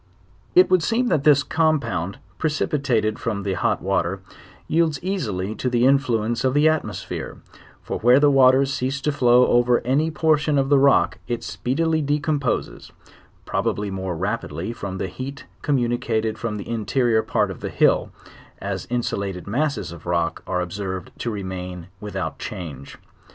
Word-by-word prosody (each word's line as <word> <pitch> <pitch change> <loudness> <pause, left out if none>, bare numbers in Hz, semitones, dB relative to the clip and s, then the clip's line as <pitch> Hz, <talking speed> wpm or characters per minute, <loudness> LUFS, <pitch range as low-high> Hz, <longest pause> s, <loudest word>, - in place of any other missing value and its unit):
It 180 +1 +7
would 185 -2 +5
seem 240 +6 +1
that 150 -4 +1
this 145 -2 +6
compound, 125 - 0 0.2
precipitated 135 -8 0
from 105 -4 -2
the 100 -1 -1
hot - - 0
water, 95 -1 0 0.5
yields 160 -2 +2
easily 110 - -2
to 125 - -2
the 120 0 +2
influence 120 -4 +2
of 130 +1 +1
the 150 +2 +5
atmosphere; 155 -1 -2 0.5
for - - -4
where 125 +4 +6
the 145 0 +5
waters 135 0 +5
cease 130 +1 -2
to 150 - +1
flow 125 -3 +5
over 120 0 +3
any 140 +6 +1
portion 155 -2 +2
of 135 0 +1
the 145 -1 +5
rock, 140 0 +3
it 120 -1 -3
speedily 160 +5 0
decomposes; 145 -3 -1 0.5
probably 100 -1 -1
more 95 -3 -3
rapidly 95 -1 -3
from 100 -4 -6
the - - -2
heat 130 +9 -7 0.2
communicated 120 -5 0
from 110 -3 -3
the 100 - -7
interrior 115 +1 +1
part - - 0
of - - -9
the - - -4
hill, - - +2 0.5
as - - -4
insu 120 -4 -1
lated 95 -3 -5
masses 125 - -1
of 85 -2 -11
the - - -5
rock 85 -1 0
are 90 -1 0
observed 95 0 -5
to 120 - -2
remain 90 -4 -6
without 105 -1 -4
change. 75 -7 -7
120 Hz, 160 wpm, -23 LUFS, 100-145 Hz, 0.5 s, It